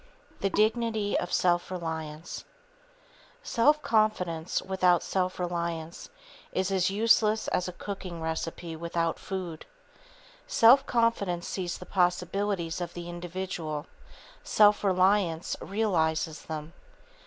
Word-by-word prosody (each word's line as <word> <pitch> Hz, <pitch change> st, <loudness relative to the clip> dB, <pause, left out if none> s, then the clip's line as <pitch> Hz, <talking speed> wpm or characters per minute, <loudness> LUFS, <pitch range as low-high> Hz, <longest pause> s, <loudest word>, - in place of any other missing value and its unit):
IV -, -, -29 dB
The 195 Hz, -, +2 dB
Dignity 215 Hz, 0 st, +1 dB
of 175 Hz, -, -4 dB
Self 175 Hz, -1 st, +2 dB
Reliance 160 Hz, -2 st, -5 dB, 1.0 s
Self 295 Hz, -, +3 dB
confidence, 180 Hz, -7 st, +1 dB
without 185 Hz, -2 st, +2 dB
self 185 Hz, -1 st, -1 dB
reliance, 170 Hz, -2 st, -3 dB, 0.4 s
is 190 Hz, +1 st, -1 dB
as 190 Hz, -1 st, +2 dB
useless 215 Hz, +1 st, +3 dB
as 180 Hz, -, 0 dB
a -, -, -3 dB
cooking 185 Hz, -3 st, -6 dB
recipe, 160 Hz, +1 st, -4 dB
without 165 Hz, 0 st, -2 dB
food. 180 Hz, -4 st, -6 dB, 0.8 s
Self 270 Hz, -, +6 dB
confidence 205 Hz, -7 st, +1 dB
sees 180 Hz, -3 st, -3 dB
the 180 Hz, -, -10 dB
possibilities 180 Hz, -1 st, 0 dB
of 175 Hz, -1 st, -5 dB
the 175 Hz, 0 st, -6 dB
individual; 175 Hz, -3 st, -4 dB, 0.6 s
self 210 Hz, -1 st, +4 dB
reliance 185 Hz, -3 st, +2 dB
realizes 165 Hz, -7 st, 0 dB
them. 155 Hz, 0 st, -6 dB
180 Hz, 110 wpm, -28 LUFS, 170-205 Hz, 1.0 s, Self